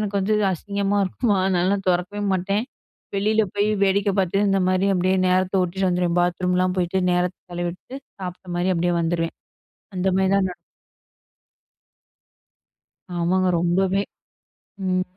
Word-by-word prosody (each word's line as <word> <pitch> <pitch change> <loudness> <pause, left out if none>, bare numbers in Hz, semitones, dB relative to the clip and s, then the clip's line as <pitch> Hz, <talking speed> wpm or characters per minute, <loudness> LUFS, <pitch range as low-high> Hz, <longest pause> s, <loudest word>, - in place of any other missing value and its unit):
எனக்கு 205 -1 -1
வந்து 210 +3 +1 0.2
அசிங்கமா 200 +2 -1
இருக்குமா, 205 +2 0
அதனால 190 +2 +1
தொறக்கவே 180 +3 0
மாட்டேன். 195 +4 0 0.5
வெளியில 215 +2 +2
போயி 205 +1 +1 0.2
வேடிக்கை 200 +1 +2
பார்த்துட்டு 195 +2 +2
இந்த 195 - +2
மாதிரி, 185 +1 +2
அப்படியே 185 +1 +2
நேரத்த 185 +1 +2
ஒட்டிட்டு 190 +2 -1
வந்துருவேன். 175 -1 +1
பாத்ரூம்லாம் 180 +1 +1
போயிட்டு 180 +2 0
நேரத்த 180 +1 0 0.2
செலவிட்டு 175 +9 -5 0.2
சாப்ட்ட 180 -1 -6
மாரி 180 +2 +1
அப்படியே 175 +1 +1
வந்துருவேன். 165 0 -1 0.6
அந்த 180 +1 0
மாதிரி 190 0 +2
தான் 195 -1 +2
ந - - -7 2.6
ஆமாங்க. 185 +2 +2
ரொம்பவே 175 +3 +2 1.0
ம். 185 0 +1
185 Hz, 125 wpm, -23 LUFS, 175-195 Hz, 2.6 s, வெளியில